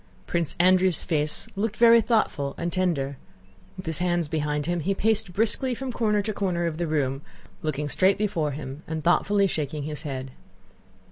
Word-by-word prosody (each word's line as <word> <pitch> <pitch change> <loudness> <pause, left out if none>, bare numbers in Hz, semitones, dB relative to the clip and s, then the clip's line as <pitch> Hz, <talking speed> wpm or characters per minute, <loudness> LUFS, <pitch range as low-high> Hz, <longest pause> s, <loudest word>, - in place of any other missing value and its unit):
Prince 170 -3 -1
Andrew's 185 -1 +4
face 150 -1 0
looked 215 +1 -2
very 235 0 +7
thoughtful 210 - 0
and 170 0 -3
tender. 150 -7 0 0.6
With 185 - -8
his 160 -2 -2
hands 175 -2 0
behind 150 -1 -1
him 175 +1 -1
he 190 +5 -1
paced 220 -1 +1
briskly 230 +6 0
from 265 +1 -4
corner 210 -3 +1
to 215 +1 -2
corner 180 -4 -1
of 165 -1 -3
the 170 - -1
room, 140 -3 -1 0.4
looking 150 -1 -2
straight 190 +6 +3
before 195 -8 0
him 140 0 -7
and 160 -1 -4
thoughtfully 200 +3 +3
shaking 150 -4 -2
his 150 0 -5
head. 135 -3 -5
170 Hz, 175 wpm, -25 LUFS, 150-200 Hz, 0.6 s, very